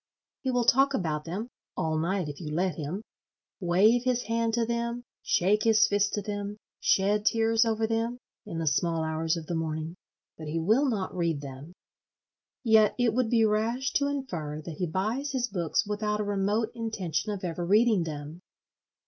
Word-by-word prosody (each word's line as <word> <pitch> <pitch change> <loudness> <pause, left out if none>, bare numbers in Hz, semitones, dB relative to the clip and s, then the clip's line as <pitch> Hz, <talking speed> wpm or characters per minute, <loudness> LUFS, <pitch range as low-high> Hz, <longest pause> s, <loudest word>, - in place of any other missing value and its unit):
He 265 - -2
will 245 -2 +1
talk 270 +3 +4
about 155 -7 -2
them—all 170 -4 -4
night 180 +1 0
if 145 +2 -7
you 150 -3 -5
let 180 +3 0
him—wave 190 +5 -1
his 250 -1 +1
hand 230 0 0
to 235 -1 +1
them, 235 +1 -2 0.2
shake 205 +4 +2
his 220 -1 +5
fist 205 0 +1
at 205 - -3
them, 205 0 -4 0.2
shed 205 +2 +2
tears 225 +1 +3
over 225 0 +1
them 225 +2 -1 0.3
(in 165 - -6
the 165 - -2
small 165 +3 +1
hours 160 +1 0
of 165 - -6
the 175 - -4
morning); 160 0 -3 0.4
but 155 - -7
he 155 +2 -2
will 225 - +3
not 200 -6 -2
read 165 -4 0
them. 140 +4 -9 0.9
Yet 220 -3 +5
it 245 -3 +2
would 245 -1 +1
be 225 -1 +4
rash 230 +5 0
to 280 - +2
infer 175 - -4
that 165 -3 -7
he 180 - -1
buys 220 - -2
his 250 -2 0
books 175 -6 0
without 210 0 -1
a - - 0
remote 205 +3 0
intention 210 -5 -2
of 200 -2 -5
ever 175 -1 -3
reading 210 +2 +4
them. 155 +1 -7
205 Hz, 175 wpm, -28 LUFS, 165-230 Hz, 0.9 s, his